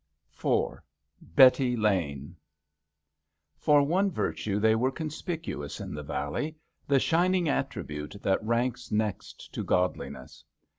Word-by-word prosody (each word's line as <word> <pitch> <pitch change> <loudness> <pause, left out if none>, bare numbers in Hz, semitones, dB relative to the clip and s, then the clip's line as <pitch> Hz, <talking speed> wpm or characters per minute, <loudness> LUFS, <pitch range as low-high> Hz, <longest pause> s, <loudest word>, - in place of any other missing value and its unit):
22 - - -2 0.2
^ - - -12
IV 85 - -23
BETTY 130 -1 +6
LANE 85 -10 -1 1.2
For 145 -1 +5
one 185 +7 +2
virtue 105 - -2
they 110 +1 +4
were 120 +4 +2
conspicuous 155 - -5
in - - -6
the 75 - -5
valley 155 - -3 0.2
— - - -43
the 140 -1 +4
shining 175 +3 +2
attribute 75 - -3
that 95 +2 +1
ranks 120 +2 -1
next 105 -1 -3
to - - -3
godliness. 90 -8 -2
120 Hz, 130 wpm, -28 LUFS, 95-150 Hz, 1.2 s, BETTY